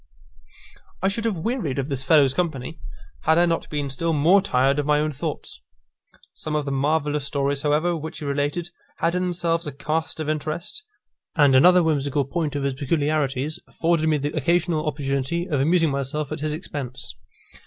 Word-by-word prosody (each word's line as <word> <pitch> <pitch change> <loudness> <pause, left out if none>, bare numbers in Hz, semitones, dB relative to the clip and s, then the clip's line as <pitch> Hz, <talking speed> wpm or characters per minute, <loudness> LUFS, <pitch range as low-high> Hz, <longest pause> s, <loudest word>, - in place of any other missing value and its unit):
I 195 - +4
should 225 +3 -3
have 215 -5 0
wearied 170 - -2
of 135 -1 -1
this 135 -2 -2
fellow's 140 -2 +5
company, 160 -2 -3 0.5
had 160 +1 +4
I 175 - +5
not 165 -1 -1
been 145 -2 -2
still 165 +5 -1
more 165 +7 +5
tired 135 -5 +2
of 145 - -1
my 150 0 +4
own 155 0 0
thoughts. 130 - -5 0.7
Some 155 -1 -4
of 150 -1 0
the 140 - -2
marvellous 145 +1 0
stories, 140 0 0
however, 155 +4 +1
which 160 0 -6
he 150 - -6
related, 145 +5 -1 0.3
had 165 +1 +1
in 180 - 0
themselves 170 -2 -1
a - - -3
cast 155 +4 -2
of 155 - -3
interest, 155 - -3 0.5
and 145 -5 +5
another 180 +6 +7
whimsical 145 -3 +1
point 150 +1 -2
of 140 - -1
his 140 -1 0
peculiarities 145 +1 -1
afforded 165 -1 +1
me 155 - +3
the 145 +1 -3
occasional 165 +1 +1
opportunity 145 +4 -1
of 150 -7 0
amusing 165 +2 +3
myself 140 +2 -2
at 155 - -3
his 150 +1 -1
expense. 135 -5 -6
150 Hz, 180 wpm, -23 LUFS, 140-165 Hz, 0.7 s, another